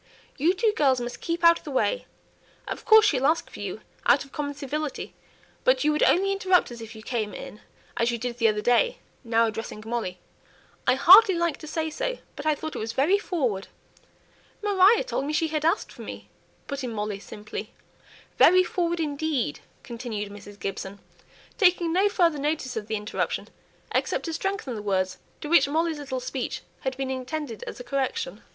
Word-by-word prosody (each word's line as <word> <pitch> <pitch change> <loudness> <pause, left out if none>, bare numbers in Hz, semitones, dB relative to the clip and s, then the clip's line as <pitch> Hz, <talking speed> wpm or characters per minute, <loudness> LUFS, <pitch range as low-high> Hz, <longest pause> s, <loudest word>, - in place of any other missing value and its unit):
You 335 +7 +2
two 435 +2 +2
girls 265 -4 +3
must 240 0 -6
keep 340 0 -3
out 335 0 +7
of - - -23
the - - -7
way. 390 - 0 0.6
Of - - -5
course 440 -2 +8
she'll 275 -9 +3
ask 325 +2 0
for - - -10
you, - - -5 0.3
out - - +5
of 275 - -19
common 285 -1 -4
civility; 290 +1 -4 0.5
but - - +3
you 305 - +3
would 300 - 0
only 390 +2 +4
interrupt 375 -6 +2
us 235 -1 -8
if 225 0 -9
you 220 - -11
came 220 -3 -3
in, 210 - -9 0.4
as 235 - +2
you 235 - -1
did 240 +1 -5
the 230 - +4
other 210 -1 +1
day;" 475 - +3 0.3
now 230 -1 +3
addressing 220 -1 -5
Molly 225 -6 -3 0.7
"I - - +5
hardly 375 +8 +8
like 340 -1 0
to 310 - -10
say 315 0 -2
so, - - -2 0.2
but 290 - -5
I 305 - +3
thought 315 +2 -6
it - - -3
was 225 +1 -4
very 320 +11 +3
forward." 250 - -2 1.0
"Maria 405 +2 +5
told 380 - -2
me 300 - -2
she 320 +1 +1
had 305 -1 -2
asked 330 +6 +1
for - - -12
me," - - -8 0.4
put 280 -1 -5
in 250 - -3
Molly, 210 -2 -3
simply. 210 +1 -8 0.7
"Very 370 +1 +7
forward 345 -1 -1
indeed!" 290 - -1 0.2
continued 225 -4 -5
Mrs. 205 0 -11
Gibson, 195 0 -5 0.6
taking 355 -4 +4
no 390 +3 +4
further 335 -7 +2
notice 290 -3 -2
of 215 -2 -4
the 220 - -1
interruption, 210 0 -3 0.4
except - - 0
to 330 - -3
strengthen 390 - -2
the 215 - -5
words 185 -2 -1 0.2
to - - -5
which 295 -3 +5
Molly's 320 +1 0
little 265 -3 -4
speech 255 0 -4 0.2
had 265 -1 -3
been 265 -1 -2
intended 260 -2 -4
as - - -7
a - - -6
correction. 275 - -2
285 Hz, 195 wpm, -26 LUFS, 235-340 Hz, 1.0 s, course